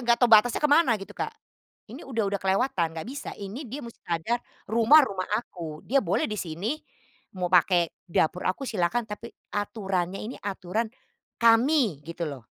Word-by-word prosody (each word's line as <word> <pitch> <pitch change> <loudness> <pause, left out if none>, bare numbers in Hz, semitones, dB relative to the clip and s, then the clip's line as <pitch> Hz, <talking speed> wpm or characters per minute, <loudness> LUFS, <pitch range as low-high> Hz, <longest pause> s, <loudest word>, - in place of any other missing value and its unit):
enggak 240 -1 +3
tahu 245 0 +3
batasnya 220 +2 +6
kemana 290 -5 +5
gitu, 195 -1 -10
Kak. - - -4 0.6
Ini 245 +8 -9
udah 230 -5 -1
udah 200 - -1
kelewatan, 190 -1 +1
enggak 160 - -5
bisa, 280 +3 -6
ini 215 +8 -7
dia 270 +6 -5
musti 235 - -11
sadar, 175 +9 0 0.3
rumah 230 +8 +7
rumah 190 -6 -4
aku. 165 -9 -7
Dia 275 +2 +3
boleh 190 -4 0
di 210 - -3
sini, 190 - -3 0.6
mau 180 -1 -1
pakai 175 -1 +4 0.2
dapur 170 +1 +1
aku 230 +9 -2
silakan, 225 0 0
tapi 210 +3 -7 0.2
aturannya 195 -3 -2
ini 230 - -6
aturan 200 +3 -2 0.5
kami 230 - +4
gitu 170 +1 -4
loh. 135 -5 -8
210 Hz, 165 wpm, -27 LUFS, 180-240 Hz, 0.6 s, rumah